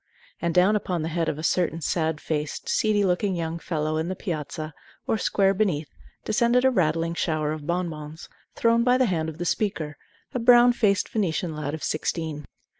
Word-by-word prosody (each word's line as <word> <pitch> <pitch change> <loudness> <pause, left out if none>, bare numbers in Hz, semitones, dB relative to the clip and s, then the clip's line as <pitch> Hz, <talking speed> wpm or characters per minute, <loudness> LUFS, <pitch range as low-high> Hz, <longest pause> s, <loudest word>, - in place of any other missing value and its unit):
And 170 - 0
down 185 +4 +5
upon 180 -5 -1
the 160 - -2
head 165 -1 0
of 145 - -3
a 155 - -6
certain 165 -1 +1
sad 160 -1 -1
faced, 150 -2 -3
seedy 210 -2 +2
looking 185 +1 +1
young 165 -1 -3
fellow 155 -2 -2
in 160 +1 -1
the 185 - -3
piazza, 155 -4 -5 0.3
or 220 - 0
square, 195 -1 +2
beneath, 180 -8 0 0.4
descended 235 +3 +3
a 260 - +5
rattling 165 -5 +1
shower 155 -3 -1
of 155 -1 -6
bonbons, 160 -3 -4 0.3
thrown 230 0 +3
by 250 +1 +4
the 260 - +3
hand 165 -6 -1
of 155 - -9
the 175 - -4
speaker, 165 -7 -1 0.4
a 250 - -1
brown 240 +1 +6
faced 205 -5 +2
Venetian 175 -5 -1
lad 150 0 -3
of 160 - -9
sixteen. 155 -1 -2
170 Hz, 190 wpm, -25 LUFS, 155-205 Hz, 0.4 s, brown